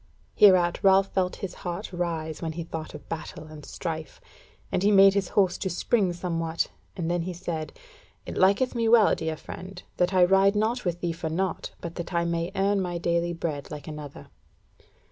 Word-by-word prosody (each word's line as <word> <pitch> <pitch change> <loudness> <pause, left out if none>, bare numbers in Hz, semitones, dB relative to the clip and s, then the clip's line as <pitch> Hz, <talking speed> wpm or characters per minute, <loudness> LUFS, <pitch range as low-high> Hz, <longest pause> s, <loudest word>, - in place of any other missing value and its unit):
Hereat 180 -4 +5
Ralph 195 0 +4
felt 185 -1 0
his 180 - -7
heart 175 +1 -6
rise, 165 -3 -3
when 160 -2 -3
he 170 +1 -4
thought 160 -1 -7
of - - -11
battle 160 -1 -6
and 155 -1 -11
strife, 160 +1 -6 0.5
and - - 0
he 200 - +4
made 195 -1 +7
his 195 -2 0
horse 185 -2 +2
to 190 - -2
spring 185 +2 +1
somewhat, 165 -2 -2 0.3
and 170 -3 -2
then 175 0 0
he 180 +2 -4
said: 170 -3 -4 0.5
"It - - -6
liketh 200 +7 +3
me 230 -2 +1
well, 225 -3 +6
dear 160 -1 -2
friend, 185 +3 -9
that 180 +1 +2
I 185 -2 +5
ride 195 +2 +4
not 225 +3 0
with 175 -1 -2
thee 170 -1 -1
for 165 -1 -4
naught, 185 +4 -2
but 170 - -5
that 175 0 -5
I 170 0 +2
may 170 +1 -1
earn 195 +1 +2
my 175 -2 -2
daily 170 0 0
bread 155 -4 -4
like 150 -1 -8
another." 150 -2 -8
175 Hz, 195 wpm, -26 LUFS, 165-195 Hz, 0.5 s, made